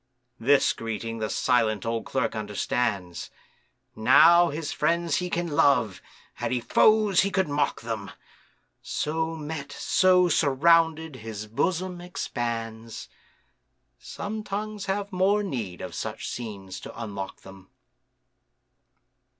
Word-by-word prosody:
This 135 +4 +4
greeting 115 0 -5
the 110 -1 -2
silent 115 -5 +1
old 115 0 -2
Clerk - - -1
understands. 105 -3 -2 0.7
Now 165 +9 +6
his 150 +1 -4
friends 170 -1 +1
he 180 +3 -2
can 175 0 -1
love, 125 -9 +2 0.4
had 120 -1 -1
he 125 - +1
foes, 210 - +4
he 200 - +1
could 190 -2 +1
mock 145 0 0
them; 110 -3 -4 0.7
So 160 +2 -2
met, 150 -2 -6
so 185 -1 +3
surrounded, 160 0 +3
his 110 -2 -7
bosom 175 - -2
expands,— 115 - -5 0.9
Some 215 +1 -6
tongues 210 0 -4
have 200 +1 -2
more 195 +3 +2
need 110 - -4
of - - -6
such - - -5
scenes 100 -5 -6
to - - -10
unlock 100 -4 -6
them. 95 0 -14
140 Hz, 120 wpm, -26 LUFS, 115-175 Hz, 0.9 s, Now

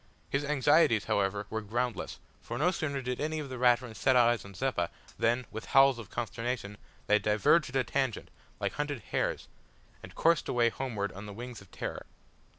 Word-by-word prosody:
His 140 +1 +1
anxieties, 145 -5 +4
however, 100 +1 0
were 110 - -2
groundless, 120 +2 -2 0.2
for - - -5
no 180 - +3
sooner 140 -6 -2
did 125 +1 -3
any 155 +1 -1
of 150 -3 -4
the 130 -1 -6
Raturans 120 -3 +2
set 130 - +3
eyes 120 -1 +4
on 100 -1 -12
Zeppa, 95 -6 -1 0.3
than, 120 +2 +2
with 110 +1 -6
howls 135 -2 +7
of 110 -5 -9
consternation, 115 -1 -4 0.3
they 105 0 +4
diverged 105 - +3
at 130 - -9
a 135 - +3
tangent 130 -5 -2 0.3
like - - -1
hunted 145 -4 -3
hares, - - -1 0.5
and - - -12
coursed 165 0 +2
away 120 -1 +3
homeward 110 -6 -3
on 100 +3 -9
the 100 - -7
wings 120 +1 -8
of 100 - -16
terror. - - -6
120 Hz, 185 wpm, -30 LUFS, 105-135 Hz, 0.5 s, howls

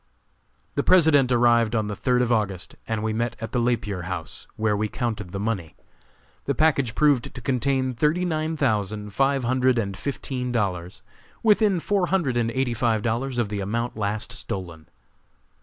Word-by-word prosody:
The - - +1
President 150 -7 +5
arrived 120 -2 +4
on 110 -1 +1
the 105 - -4
third 125 +4 +2
of 120 - -1
August, 100 -5 -1
and 110 -1 -2
we 110 0 0
met 120 +1 -1
at 115 -1 -5
the 125 - 0
Lapier 105 -7 -1
House, 85 -5 -5
where 110 -1 +1
we 105 +1 0
counted 105 -5 -3
the 100 - -4
money. 100 -6 -3 0.7
The 140 - 0
package 140 -7 +2
proved 145 -5 +2
to - - -6
contain 130 +1 0
thirty 155 +8 +1
nine 160 -1 -1
thousand 105 -6 -1
five 135 +4 +2
hundred 130 +1 +2
and 100 -4 -1
fifteen 130 +1 -4
dollars 95 -6 -2 0.4
within 210 -4 +4
four 195 +1 0
hundred 170 -10 +1
and 115 -1 +1
eighty 130 0 -1
five 115 -2 +1
dollars 120 +3 -1
of 120 -4 0
the 105 -1 -3
amount 115 +5 -2
last 105 0 -2
stolen. 85 -5 -6
120 Hz, 175 wpm, -24 LUFS, 105-135 Hz, 0.7 s, President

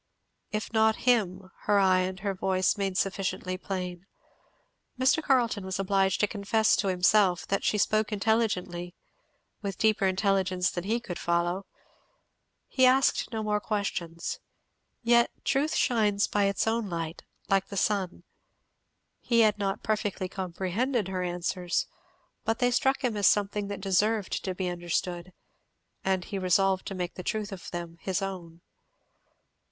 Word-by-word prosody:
"If 215 +2 -3
not 220 0 +4
him 200 -7 +2
" - - -35
her 205 - +3
eye 190 -2 +4
and 185 +1 -2
her 200 -1 -1
voice 185 0 +1
made 195 -2 -2
sufficiently 185 -1 -1
plain. 185 -1 -5 0.9
Mr. 260 +5 +3
Carleton 240 -8 +1
was 190 0 -3
obliged 195 -1 +1
to 210 - +4
confess 220 +1 +2
to 200 - 0
himself 185 0 +3
that 195 - 0
she 210 - +1
spoke 215 +1 +1
intelligently, 195 -5 0 0.7
with 195 -3 -4
deeper 215 -3 +3
intelligence 190 -1 +1
than 175 0 -4
he 225 +4 +1
could 180 -7 -7
follow. 175 +3 0 1.0
He 260 - +1
asked 265 +1 +3
no 220 -2 -3
more 210 -1 +1
questions. 180 -6 -3 0.6
Yet 235 0 +4 0.2
truth 285 +4 +1
shines 210 -4 +2
by 205 -1 +1
its 195 0 +1
own 225 -2 0
light, 165 -1 -4 0.3
like 195 -1 +2
the 200 - -6
sun. 190 -4 0 1.0
He 230 -1 +2
had 215 -1 +3
not 195 -1 -2
perfectly 210 -3 -1
comprehended 190 +5 -2
her 185 -1 -2
answers, 180 0 -1 0.6
but 225 0 0
they 245 0 +2
struck 265 +3 +1
him 240 -4 0
as 205 -2 +3
something 205 0 +1
that 200 -1 -5
deserved 200 +2 +1
to 185 -1 -2
be 185 0 -2
understood, 175 0 -3 0.7
and 190 -2 0
he 200 - -4
resolved 190 +1 +2
to 195 - -4
make 180 -1 -3
the - - -7
truth 210 +3 -3
of 190 -3 -8
them 170 -1 -6
his 190 +1 -1
own. 175 -3 -6
195 Hz, 150 wpm, -28 LUFS, 185-215 Hz, 1.0 s, not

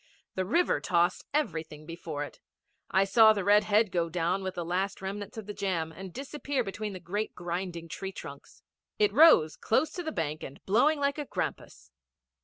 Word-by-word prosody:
The 185 - -1
river 340 - +2
tossed 175 0 +1
everything 160 - -2
before 160 -3 -5
it. 145 - -10 0.5
I 190 +1 +4
saw 220 +2 +6
the 200 -2 -2
red 205 +2 +5
head 215 -1 +3
go 170 -1 0
down 175 +3 0
with 190 -1 -4
the 175 - -3
last 190 +4 -1
remnants 200 +2 -6
of 220 - -6
the 210 - -6
jam 185 -5 -2
and 185 +3 -9
disappear 280 - -3
between 210 0 -5
the 185 - -7
great 205 +5 -3
grinding, 175 -1 -4
tree 190 +4 -5
trunks. 140 -6 -11 0.3
It 210 -1 +3
rose 215 - +7
close 310 +7 +1
to 360 - -5
the 320 -2 -4
bank 155 - -3
and 135 - -8
blowing 275 +10 +3
like 280 +1 0
a 295 - -3
grampus. - - -5
195 Hz, 190 wpm, -29 LUFS, 170-220 Hz, 0.5 s, rose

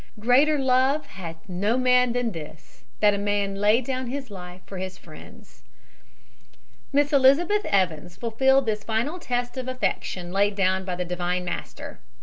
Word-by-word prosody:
"Greater 265 +7 +4
love 265 +2 +2
hath 165 -7 -10
no 200 +6 0
man 250 -1 +4
than 245 -2 -1
this, 155 -5 -11 0.2
that 210 -1 +5
a 200 - -2
man 205 -1 0
lay 210 +4 +3
down 260 0 -3
his 265 -1 -5
life 180 -1 -9
for 195 - -8
his 185 0 -5
friends." 210 +7 -15 1.3
Miss 290 +1 +2
Elizabeth 310 +10 +4
Evans 175 -3 0
fulfilled 265 +4 +2
this 215 -1 -2
final 235 +11 -2
test 245 -3 -3
of 255 -1 -4
affection 195 -7 -3
laid 200 +2 +1
down 190 -1 +1
by 180 -2 -3
the 180 0 -3
Divine 180 +1 -2
Master. 175 - -6
215 Hz, 155 wpm, -25 LUFS, 185-255 Hz, 1.3 s, that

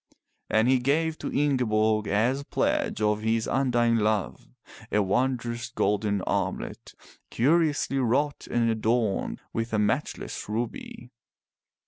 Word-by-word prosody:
And 110 +2 +3
he 130 0 +4
gave 155 +5 0
to - - -4
Ingeborg, 110 -7 +1
as 120 +7 +1
pledge 285 - -1
of 105 0 +1
his 110 0 0
undying 120 -3 +2
love, 105 -11 -1 0.4
a 105 - +3
wondrous 120 +2 -1
golden 100 -2 0
armlet - - -3 0.3
curiously 145 0 +2
wrought 135 +4 0
and 120 -1 +1
adorned 110 -1 0
with 115 0 -3
a - - +2
matchless 105 0 -2
ruby. 120 +2 -5
115 Hz, 115 wpm, -26 LUFS, 110-135 Hz, 0.4 s, he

